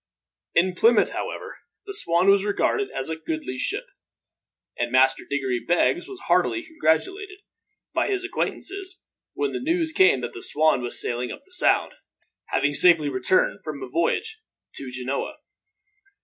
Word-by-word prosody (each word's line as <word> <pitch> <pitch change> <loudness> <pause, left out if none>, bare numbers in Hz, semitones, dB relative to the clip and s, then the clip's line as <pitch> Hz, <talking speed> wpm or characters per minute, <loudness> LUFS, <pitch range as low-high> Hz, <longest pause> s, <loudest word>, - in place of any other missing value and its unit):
In 180 +2 +3
Plymouth, 225 +4 +4
however, - - -5 0.3
the 400 - -6
Swan 175 - +1
was 195 0 +5
regarded 210 - 0
as 135 - -5
a - - -1
goodly 155 -5 -5
ship; - - -2 0.9
and 120 0 -2
Master 130 +1 +4
Diggory 135 -3 -1
Beggs 175 - +1
was 390 -1 -9
heartily 345 - +1
congratulated, 375 - -1 0.6
by - - +1
his 390 -2 -1
acquaintances, 385 0 -3 0.4
when 425 - -1
the - - -2
news 325 +3 0
came 380 +5 +4
that - - -5
the 380 - -8
Swan 155 - +2
was 120 - -2
sailing 120 0 -2
up - - -9
the 380 - -23
Sound, 365 - +3 0.6
having 145 +2 +1
safely 165 -2 +4
returned 130 +7 +1
from 145 -3 -6
a - - -5
voyage 435 - -1 0.3
to 135 - -7
Genoa. 130 - -4
180 Hz, 150 wpm, -24 LUFS, -, 0.9 s, was